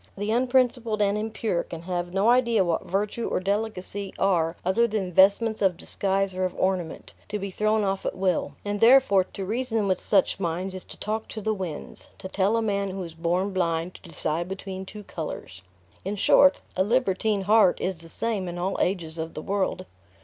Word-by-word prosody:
The 205 +2 -2
unprincipled 245 -2 +2
and 205 -1 +2
impure 215 -3 -1
can 165 -1 -8
have 175 0 -3
no 195 +4 +2
idea 235 -4 +3
what 170 -2 -1
virtue 205 +5 -1
or - - 0
delicacy 200 0 -2
are 170 -4 +2
other 230 +6 +3
than 205 -4 -2
vestments 205 +4 +4
of 190 -4 +2
disguise 195 +1 -1
or 185 0 -2
of 185 -1 -1
ornament, 185 -3 -2 0.2
to 210 - -2
be 200 -1 -5
thrown 215 +2 +1
off 195 -1 -1
at - - -3
will; 185 -6 0
and 205 0 -2
therefore, 230 -6 +6
to 195 - -7
reason 225 0 -1
with 185 - +1
such 195 -1 +2
minds 180 +1 -2
is 185 - -5
to - - -7
talk 220 +1 -3
to 220 - -6
the 215 +1 0
winds 185 -6 -6
to - - -7
tell 195 +3 +1
a 230 - 0
man 200 -2 0
who 190 0 -4
is 165 -2 -8
born 175 +4 -1
blind 170 -1 0
to - - -14
decide 165 0 -2
between 190 0 -6
two 210 +1 -9
colors. 150 - -7 0.4
In 195 +3 -3
short, 280 +7 +5 0.2
a 185 - +3
libertine 215 -2 +1
heart 205 -2 +4
is 185 -2 -2
the 165 0 -8
same 215 -1 -2
in 175 0 -5
all 185 +2 -1
ages 170 -3 -1
of 160 0 -5
the 155 - -4
world. 190 -1 -1
195 Hz, 200 wpm, -26 LUFS, 180-215 Hz, 0.4 s, therefore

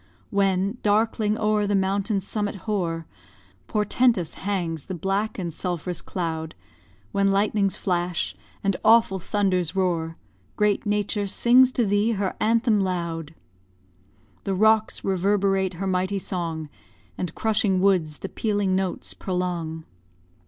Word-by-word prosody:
When, 195 +2 +1
darkling 215 0 +2
o'er 215 -1 +1
the 205 - +1
mountain's 195 +1 0
summit 205 -2 -2
hoar, 170 -6 -1 0.6
Portentous 210 -3 +1
hangs 175 -6 -3
the 190 - -5
black 195 +5 -1
and 175 -4 -3
sulph'rous 175 0 -4
cloud, 160 -3 -4 0.6
When 200 0 +2
lightnings 200 0 +1
flash, 175 -2 -1 0.3
and 195 -2 +1
awful 225 -4 +5
thunders 185 -3 0
roar, 170 -4 0 0.4
Great 210 0 +1
Nature 205 0 0
sings 250 +5 +5
to 240 - +2
thee 205 +3 +2
her 195 -2 -2
anthem 225 0 +3
loud. 170 -4 -3 1.1
The 195 - -1
rocks 220 +2 +3
reverberate 195 0 +1
her 195 +3 -4
mighty 190 +1 0
song, 170 -5 -3 0.5
And 175 -2 -4
crushing 215 -3 +2
woods 180 -6 +2
the 195 - -6
pealing 205 -3 0
notes 190 -1 -2
prolong. 175 -3 -3
195 Hz, 125 wpm, -24 LUFS, 180-210 Hz, 1.1 s, awful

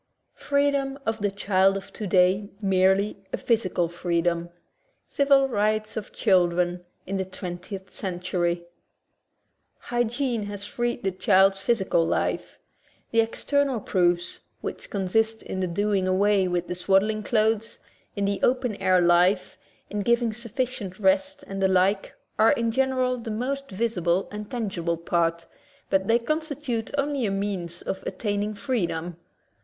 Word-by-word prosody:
Freedom 280 -1 +1
of 225 0 -1
the 205 0 +1
Child 195 -1 +2
of 195 0 -10
Today 190 0 +2
Merely* 195 +1 +2
a - - -1
Physical 190 -7 +1
Freedom 170 0 -1 0.3
— - - -44
Civil 275 -1 +3
Rights 215 -2 0
of 215 -2 -5
Children 180 -3 +2 0.2
in 195 +1 -2
the 190 - 0
Twentieth 185 +1 -7
Century 175 -2 -2 1.1
Hygiene 240 -2 -1
has 205 -1 -5
freed 240 +3 -2
the 195 - +1
child's 195 +1 +4
physical 195 -5 +2
life. - - -1 0.5
The 230 - +3
external 275 +3 0
proofs, 175 -3 0 0.2
which - - -6
consist 220 +3 0
in 190 - -5
the 185 - 0
do 205 +5 0
ing 190 -2 +1
away 195 0 +3
with 175 -1 -1
the - - -3
swaddling 195 +4 +2
clothes, 220 0 +1 0.4
in 200 -1 0
the 200 0 0
open 250 -3 +1
air 185 -1 +3
life, 175 +2 +3 0.4
in 205 0 -1
giving 235 +1 +2
sufficient 235 -4 -4
rest, 285 +3 +1
and 195 0 -5
the 190 - +4
like, 190 +2 +1 0.2
are, 220 +1 +6
in 230 -1 0
general, 255 0 +1
the 230 - -6
most 275 +5 -3
visible 190 -4 0
and 210 0 -6
tangible 190 -8 -2
part, 170 0 0 0.5
but 190 0 +2
they 230 - +5
constitute 290 -3 -2
only 280 -4 0
a - - 0
means 195 -4 -3
of 190 - -4
attaining 210 0 -2
freedom. 175 - -2
205 Hz, 140 wpm, -25 LUFS, 185-235 Hz, 1.1 s, are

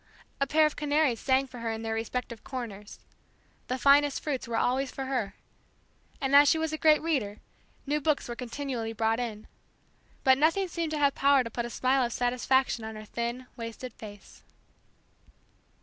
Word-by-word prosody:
A 275 - +1
pair 310 +2 +4
of 305 - 0
canaries 295 -5 +1
sang 265 0 +2
for 255 -2 -11
her 230 0 -3
in 225 0 -5
their 225 0 -2
respective 230 +1 -4
corners; 225 -6 -7 0.7
the 255 - -1
finest 280 +1 +4
fruits 270 -5 -3
were 230 -1 -2
always 260 +3 +1
for 270 - -5
her; 245 -7 -2 0.8
and 270 0 +1
as 285 0 +8
she - - +3
was 320 -1 -2
a - - -1
great 310 -1 +5
reader, 250 -11 -1 0.5
new 300 +1 0
books 300 -1 0
were 240 - -5
continually 245 -2 -4
brought 225 +1 0
in; 220 -3 -4 0.8
but 265 0 +5
nothing 330 +6 +3
seemed 335 -2 -3
to - - -1
have 285 -2 +3
power 280 -1 +4
to 230 - -7
put 235 +1 -3
a - - -8
smile 260 +2 +1
of 235 -1 -2
satisfaction 250 0 +1
on 220 0 -6
her 215 0 -9
thin, 235 +3 -4
wasted 230 +1 -7
face. 205 -2 -12
255 Hz, 180 wpm, -28 LUFS, 230-285 Hz, 0.8 s, as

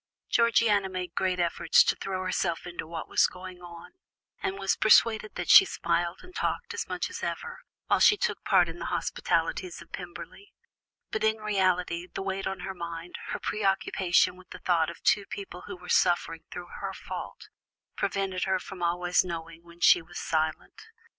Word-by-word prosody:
Georgiana 225 -4 +3
made 185 -1 -5
great 185 -1 0
efforts 170 -1 +4
to - - +1
throw 185 -1 -4
herself 175 -2 -1
into 175 -2 -6
what 165 0 -6
was - - +4
going 180 0 -10
on, 170 -1 -11 0.5
and 190 - -2
was 195 -1 +1
persuaded 215 0 +4
that - - -4
she - - +10
smiled 170 - -1
and 360 - -14
talked 475 +4 -2
as 460 - -4
much - - -2
as - - -7
ever, 475 +1 -4 0.3
while - - +2
she 415 - +6
took 475 - -2
part - - +4
in - - -8
the - - -4
hospitalities 365 - -1
of - - -14
Pemberley, 405 - -9 0.6
but 220 - -2
in 220 0 +3
reality 185 -4 0
the - - -4
weight 195 0 -2
on 190 - -4
her 190 - -4
mind, 170 -1 -7
her - - -3
preoccupation 190 -3 +1
with 185 0 -17
the 185 - -8
thought 170 -3 +1
of 170 - -9
two 200 -1 +3
people 195 -3 -8
who 200 -2 -7
were 180 0 -13
suffering 175 -3 +1
through 175 0 -8
her - - -4
fault, - - -8 0.5
prevented 195 -2 -1
her 190 0 +1
from 185 -1 -9
always 175 +1 +2
knowing 165 -2 -6
when 170 0 -17
she 175 - +7
was 175 +2 -11
silent. 160 - -2
185 Hz, 180 wpm, -28 LUFS, 175-200 Hz, 0.6 s, she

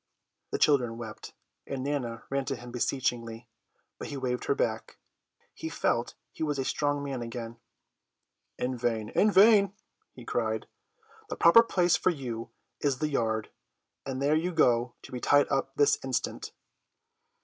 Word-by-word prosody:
The - - -2
children 125 -6 +3
wept, 110 -2 -9 0.3
and 135 -2 -4
Nana 125 -5 -3
ran 140 0 0
to 135 - -2
him 120 0 -10
beseechingly, 120 -2 -2 0.5
but - - -5
he 140 - -5
waved 125 -2 -2
her 420 - +1
back. - - -2 0.6
He 320 - -6
felt 120 - -1 0.2
he - - -12
was 150 -2 0
a 135 - -1
strong 145 0 0
man 135 -3 -4
again. 115 0 -6 1.0
"In 125 +1 -2
vain, 115 -3 -1
in 215 - +3
vain," 200 -1 +6 0.4
he - - -11
cried; - - -1 0.6
"the - - -3
proper 170 +7 +7
place 180 -6 +2
for - - +2
you 120 -8 -4 0.3
is 140 -3 0
the 155 +3 -1
yard, 110 -5 -1 0.5
and 130 -1 -4
there 140 +2 +2
you 170 +3 0
go 120 -7 +2
to - - -12
be 125 - -4
tied 145 +3 +4
up 135 0 0
this 145 0 +3
instant." 130 -2 -3
135 Hz, 160 wpm, -29 LUFS, 120-150 Hz, 1.0 s, proper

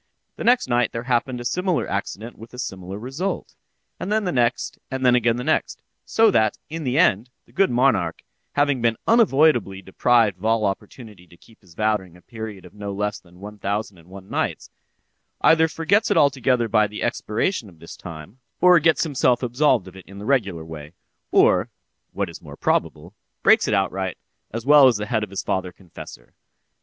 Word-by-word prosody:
The - - -6
next 240 - +3
night 120 0 +1
there 115 - -4
happened 125 0 -1
a 120 - -7
similar 180 +5 -1
accident 105 +3 -5
with 115 +3 -13
a - - -11
similar 95 -6 -6
result; 135 - -4 0.4
and 195 - -4
then 215 0 +1
the 180 - -1
next—and 130 +1 -2
then 125 - +5
again 120 -1 +2
the 125 - -4
next; 155 - -1 0.2
so 225 -1 +3
that, 110 - +2
in 165 0 -5
the 130 +2 0
end, 120 - +3 0.2
the - - -24
good 195 0 +2
monarch, 130 +3 +1 0.3
having 145 -3 +1
been 115 -1 +1
unavoidably 150 - +3
deprived 110 -1 +2
of 105 - -8
all 110 -1 +2
opportunity 100 -1 -6
to 85 - -19
keep 115 - -22
his 90 -5 -20
vow 110 0 +2
during 90 -3 -15
a - - -20
period 110 -5 -8
of 90 - -15
no 100 -1 -6
less 105 +1 -3
than 90 0 -21
one 105 +1 -10
thousand 100 -1 -3
and 85 +2 -20
one 95 0 -12
nights, - - -3 0.7
either 160 0 +5
forgets 175 +7 +1
it - - +2
altogether 130 -4 +2
by 105 0 +3
the 105 +1 -6
expiration 110 - -2
of 85 - -19
this 85 +1 -11
time, 85 +7 -11 0.2
or 180 -1 +6
gets 160 +1 +3
himself 130 -5 +1
absolved 125 -5 +2
of 95 - -12
it 95 - -13
in 100 - -12
the 100 - -8
regular 100 -11 0
way, 75 -1 -10 0.4
or - - +4 0.4
(what - - -2
is - - -11
more - - -12
probable) 80 +2 -1 0.3
breaks - - +5
it - - 0
outright, 95 -2 -1 0.3
as 115 +1 -6
well 145 -1 +7
as 120 -4 +3
the 105 - -4
head 110 0 -1
of 105 - -6
his 95 - -5
father 95 -1 -2
confessor. 85 -9 -13
115 Hz, 195 wpm, -22 LUFS, 95-135 Hz, 0.7 s, well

